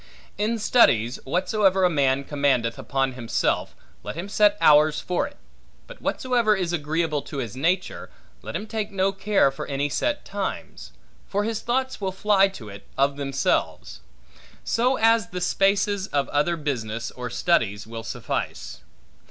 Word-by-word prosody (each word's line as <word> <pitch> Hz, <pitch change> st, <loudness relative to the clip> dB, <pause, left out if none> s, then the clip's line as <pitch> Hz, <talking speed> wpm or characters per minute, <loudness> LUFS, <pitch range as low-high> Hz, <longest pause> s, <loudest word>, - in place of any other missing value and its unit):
In 220 Hz, +3 st, 0 dB
studies, 130 Hz, -, +3 dB
whatsoever 190 Hz, +5 st, +2 dB
a -, -, +6 dB
man 140 Hz, -3 st, +2 dB
commandeth 135 Hz, -5 st, 0 dB
upon 135 Hz, -1 st, -1 dB
himself, 120 Hz, -2 st, -1 dB, 0.3 s
let -, -, -6 dB
him 180 Hz, +4 st, -6 dB
set 205 Hz, 0 st, +3 dB
hours 150 Hz, 0 st, +5 dB
for 180 Hz, -, -1 dB
it; -, -, -15 dB, 0.5 s
but -, -, -13 dB
whatsoever 240 Hz, -4 st, +1 dB
is 180 Hz, -3 st, -2 dB
agreeable 155 Hz, -1 st, -1 dB
to 140 Hz, -, -8 dB
his 120 Hz, -4 st, -4 dB
nature, 175 Hz, +7 st, -1 dB, 0.3 s
let -, -, -7 dB
him 210 Hz, -, -3 dB
take 215 Hz, -1 st, -3 dB
no 195 Hz, -1 st, +1 dB
care 195 Hz, -7 st, +2 dB
for 135 Hz, -, -7 dB
any 140 Hz, +1 st, -1 dB
set 295 Hz, -, -1 dB
times; 200 Hz, -1 st, -5 dB, 0.4 s
for 205 Hz, +1 st, -1 dB
his 220 Hz, 0 st, -2 dB
thoughts 260 Hz, 0 st, -1 dB
will 190 Hz, -1 st, -1 dB
fly 195 Hz, 0 st, +3 dB
to 170 Hz, -, -10 dB
it, 100 Hz, 0 st, -11 dB
of 140 Hz, +1 st, +2 dB
themselves; 135 Hz, -1 st, -1 dB, 0.6 s
so 250 Hz, +3 st, +1 dB
as 225 Hz, -3 st, +3 dB
the 180 Hz, -, -5 dB
spaces 195 Hz, +2 st, +1 dB
of 140 Hz, -1 st, 0 dB
other 150 Hz, +4 st, +1 dB
business, 115 Hz, -6 st, -3 dB
or 125 Hz, -1 st, -6 dB
studies, 110 Hz, -, 0 dB
will 115 Hz, +1 st, -7 dB
suffice. 110 Hz, -, -4 dB
175 Hz, 155 wpm, -24 LUFS, 135-205 Hz, 0.6 s, a